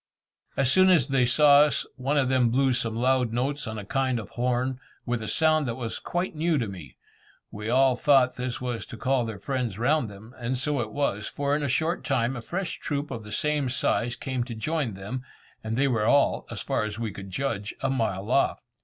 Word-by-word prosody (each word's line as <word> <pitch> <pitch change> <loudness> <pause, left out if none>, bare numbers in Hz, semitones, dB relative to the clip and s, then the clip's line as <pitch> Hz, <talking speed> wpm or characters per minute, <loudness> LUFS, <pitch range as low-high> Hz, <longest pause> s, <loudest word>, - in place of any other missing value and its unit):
As 135 -2 +3
soon 185 +4 +6
as 165 -9 +4
they 135 -2 +3
saw 145 +3 +6
us, 150 0 +2
one 135 +3 -1
of 135 -2 +3
them 130 -2 +3
blew 130 +2 +2
some 115 -2 -1
loud 125 0 +2
notes 130 +4 -1
on 110 0 -4
a 105 - -6
kind 130 +2 0
of 110 - -7
horn, 125 +1 -1 0.3
with 120 -1 -1
a 110 - -5
sound 155 -3 +2
that 115 - -2
was 120 -3 -4
quite 175 0 -3
new 160 +1 +1
to 115 -5 -1
me. 90 -6 -10 0.5
We 105 +1 -5
all 130 +1 +4
thought 130 -1 +4
this 125 -1 -3
was 125 -2 -4
to 120 - -9
call 130 -1 +1
their 110 -2 -5
friends 120 -1 -3
round 125 +1 +1
them, 105 +4 -13
and 125 +2 -2
so 140 +1 0
it 110 -2 -5
was, 110 -7 -1
for 140 0 -1
in 150 - -1
a 145 - 0
short 160 +6 0
time 130 -1 0
a 120 - -5
fresh 175 +7 -4
troop 145 -1 -3
of 115 -3 -5
the 105 - -10
same 150 +3 0
size 120 -1 0
came 130 -2 -3
to 120 -2 -6
join 140 -2 -2
them; 105 +7 -5 0.4
and 110 +1 -3
they 140 +1 +3
were 115 -5 +1
all, 140 +3 +3
as - - -5
far - - 0
as 110 0 -4
we 115 -2 -3
could 95 -1 -9
judge, 105 -1 -3
a 135 - 0
mile 110 -4 -1
off. 135 - +2
125 Hz, 225 wpm, -26 LUFS, 115-140 Hz, 0.5 s, soon